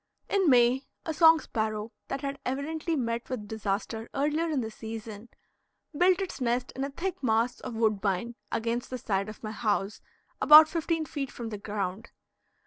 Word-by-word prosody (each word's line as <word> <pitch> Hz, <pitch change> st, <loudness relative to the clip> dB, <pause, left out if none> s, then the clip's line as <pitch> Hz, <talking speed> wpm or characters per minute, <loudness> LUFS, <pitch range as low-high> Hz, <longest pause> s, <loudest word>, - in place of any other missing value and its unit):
In 385 Hz, -5 st, +3 dB
May, 250 Hz, +1 st, +4 dB, 0.2 s
a 320 Hz, -, -2 dB
song 320 Hz, +1 st, +7 dB
sparrow, 215 Hz, -3 st, -3 dB, 0.2 s
that 275 Hz, -, -4 dB
had 280 Hz, 0 st, -4 dB
evidently 315 Hz, +5 st, -2 dB
met 235 Hz, -3 st, -2 dB
with 230 Hz, -5 st, -4 dB
disaster 220 Hz, +2 st, -3 dB
earlier 300 Hz, +4 st, +1 dB
in 290 Hz, -4 st, 0 dB
the 220 Hz, -1 st, -5 dB
season, 220 Hz, 0 st, -8 dB, 0.7 s
built 360 Hz, +4 st, +4 dB
its 375 Hz, -7 st, -5 dB
nest 245 Hz, +1 st, 0 dB
in 265 Hz, -, -2 dB
a 275 Hz, -, -2 dB
thick 365 Hz, +6 st, -4 dB
mass 230 Hz, -1 st, +1 dB
of 245 Hz, -3 st, -6 dB
woodbine 215 Hz, 0 st, 0 dB, 0.2 s
against 235 Hz, +2 st, -2 dB
the 255 Hz, -, -4 dB
side 200 Hz, -3 st, -1 dB
of 215 Hz, -, -11 dB
my 215 Hz, -, -4 dB
house, 210 Hz, -2 st, -1 dB, 0.4 s
about 305 Hz, +1 st, +10 dB
fifteen 325 Hz, 0 st, -1 dB
feet 280 Hz, -3 st, -4 dB
from 235 Hz, -2 st, -6 dB
the 210 Hz, -2 st, -6 dB
ground. 205 Hz, +1 st, -4 dB
240 Hz, 170 wpm, -28 LUFS, 220-295 Hz, 0.7 s, about